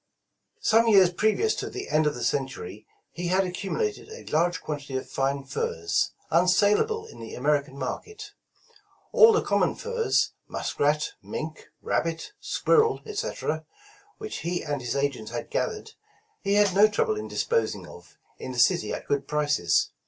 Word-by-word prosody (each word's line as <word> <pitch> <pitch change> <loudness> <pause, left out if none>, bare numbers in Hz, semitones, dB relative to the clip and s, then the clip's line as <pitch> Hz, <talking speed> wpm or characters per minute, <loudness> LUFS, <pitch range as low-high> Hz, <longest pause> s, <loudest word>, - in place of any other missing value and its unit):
Some 230 - +4
years 190 -5 +6
previous 220 - +2
to - - -4
the 390 - -6
end 155 0 +3
of 150 - 0
the 120 - -5
century, 115 -6 -3 0.2
he 175 0 -4
had 185 +2 +3
accumulated 205 - -3
a 455 +2 -10
large 170 +1 +2
quantity 145 -4 -4
of 130 - -5
fine 135 +1 -1
furs, 85 -11 -1 0.2
unsalable 205 - +3
in - - -13
the 115 -1 -8
American 140 0 0
market. 420 - -6 0.8
All 450 0 +8
the 440 - +2
common - - +1
furs, 475 -1 0 0.2
muskrat, 150 +1 0
mink, 155 0 -6 0.2
rabbit, 165 -1 -1
squirrel, 450 -1 +2
etc., 410 - -3 0.5
which 430 0 -6
he 175 +1 -2
and 145 -3 -3
his 120 -1 -3
agents 140 -6 -1
had - - -6
gathered, - - -2 0.5
he 200 +1 +1
had 205 -2 +4
no 205 +3 +7
trouble 205 - 0
in 105 0 -5
disposing 110 +1 -1
of - - -14 0.2
in 130 - -6
the - - -7
city 120 -3 +3
at - - -5
good 140 -1 0
prices. 150 - +1
165 Hz, 155 wpm, -26 LUFS, 135-220 Hz, 0.8 s, All